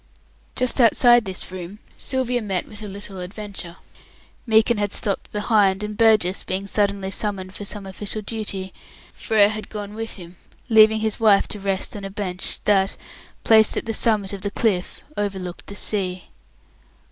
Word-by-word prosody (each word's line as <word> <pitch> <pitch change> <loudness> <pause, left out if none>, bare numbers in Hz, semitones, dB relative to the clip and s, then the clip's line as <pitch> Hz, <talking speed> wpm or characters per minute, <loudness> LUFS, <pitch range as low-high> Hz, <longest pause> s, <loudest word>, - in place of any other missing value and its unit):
Just 255 +1 +1
outside 240 0 +5
this 190 -1 -5
room, 185 +2 -7 0.2
Sylvia 250 -2 -1
met 195 -4 -2
with 210 0 -6
a 210 - -6
little 200 -1 -6
adventure. 190 -2 -6 0.7
Meekin 220 0 +4
had 205 -1 0
stopped 200 -1 0
behind, 205 -2 +2
and 210 0 -4
Burgess, 215 -4 +3
being 190 +1 -3
suddenly 200 -1 0
summoned 195 -2 -2
for 205 - -7
some 200 0 -6
official 205 +2 -5
duty, 200 -3 -5 0.4
Frere 210 -2 +3
had 215 0 -5
gone 205 -1 -6
with 225 +1 -2
him, 175 -2 -11 0.3
leaving 220 -1 +6
his 220 -1 -1
wife 210 -3 +5
to 210 - -4
rest 195 0 -2
on 205 - -7
a 195 - -4
bench 190 -2 -3
that, 195 -1 +2 0.5
placed 220 -1 +5
at - - -2
the 225 - -2
summit 210 -3 +1
of 195 - -6
the 200 - -2
cliff, 200 -3 -1
overlooked 190 -4 -4
the 200 - -8
sea. 185 -3 -2
205 Hz, 165 wpm, -22 LUFS, 190-220 Hz, 0.7 s, leaving